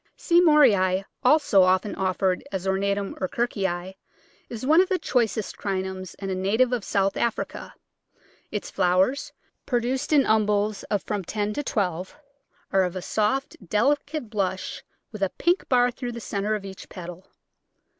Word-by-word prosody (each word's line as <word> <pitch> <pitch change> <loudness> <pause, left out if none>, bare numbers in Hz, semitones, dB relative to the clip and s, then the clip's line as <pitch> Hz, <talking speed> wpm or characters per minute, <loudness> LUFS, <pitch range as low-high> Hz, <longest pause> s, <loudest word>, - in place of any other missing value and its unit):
C. 345 0 +4
Moorei, 205 - +4 0.2
also 255 -7 +5
often 185 +2 +2
offered 185 -1 0
as 190 -1 -3
ornatum 200 +1 0
or 185 - +1
Kirkii, 190 -5 -2 0.6
is 235 +1 -6
one 315 +5 +6
of 375 - 0
the 375 - +2
choicest 225 - -1
Crinums 190 -1 -4
and 195 -1 -4
a - - 0
native 215 +7 +1
of 240 -4 -1
South 195 0 0
Africa, 235 -2 -3 0.7
Its 210 - -5
flowers, 190 +8 +1 0.4
produced 250 +3 -1
in 290 -3 +5
umbels 210 -1 +1
of 205 -3 -1
from 205 -2 -3
ten 210 +3 -2
to 290 - -2
twelve, 190 - -2 0.6
are 195 - +5
of 180 -1 -1
a 185 - -3
soft, 220 +6 0
delicate 285 +4 0
blush 190 -3 -2 0.3
with 215 -3 -9
a 195 - +2
pink 350 - 0
bar 245 -1 +4
through 245 0 -6
the 235 - -6
centre 210 -1 -2
of 205 -2 -6
each 190 0 -10
petal. 175 0 -9
205 Hz, 155 wpm, -25 LUFS, 190-245 Hz, 0.7 s, one